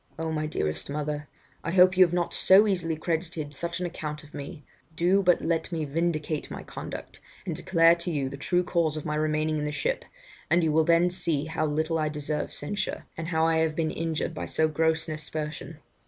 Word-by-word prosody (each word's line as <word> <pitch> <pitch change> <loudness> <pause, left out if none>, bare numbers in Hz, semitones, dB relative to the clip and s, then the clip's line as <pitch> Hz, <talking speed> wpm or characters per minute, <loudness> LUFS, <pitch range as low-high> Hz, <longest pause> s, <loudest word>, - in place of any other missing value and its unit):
Oh! 160 0 -2
my 155 -1 -1
dearest 75 - -2
mother, 150 0 -3 0.4
I - - -2
hope 185 +1 +6
you 185 - +8
have 175 - +2
not 175 -1 0
so 195 +3 +6
easily 175 -6 0
credited 160 -2 -3
such 170 +4 -2
an 180 - -2
account 155 -2 -5
of 150 - -17
me; 145 +2 -7 0.3
do 180 +4 +3
but 180 -2 +3
let 165 +1 0
me 160 -2 -1
vindicate 155 0 -1
my - - -7
conduct, - - -7 0.3
and - - -2
declare 165 -3 +5
to 170 +1 -4
you 145 -5 -1
the 135 - -6
true 175 +6 +1
cause 170 -3 0
of 155 - -6
my 150 - -1
remaining 155 0 0
in - - -2
the 150 - -2
ship, - - -1 0.5
and 170 0 +4
you 160 - +2
will 160 +1 +3
then 170 +2 +4
see 170 -5 0
how 155 0 -1
little 160 +2 0
I 155 -1 +1
deserve 150 0 -2
censure, 195 +7 -3
and 160 0 -5
how 160 -1 +2
I 165 0 +3
have 160 -1 +1
been 160 -1 0
injured 165 0 -2
by - - -5
so 160 - +2
gross 160 +1 +1
an 155 - -3
aspersion. 155 +1 -5
160 Hz, 215 wpm, -27 LUFS, 150-170 Hz, 0.5 s, you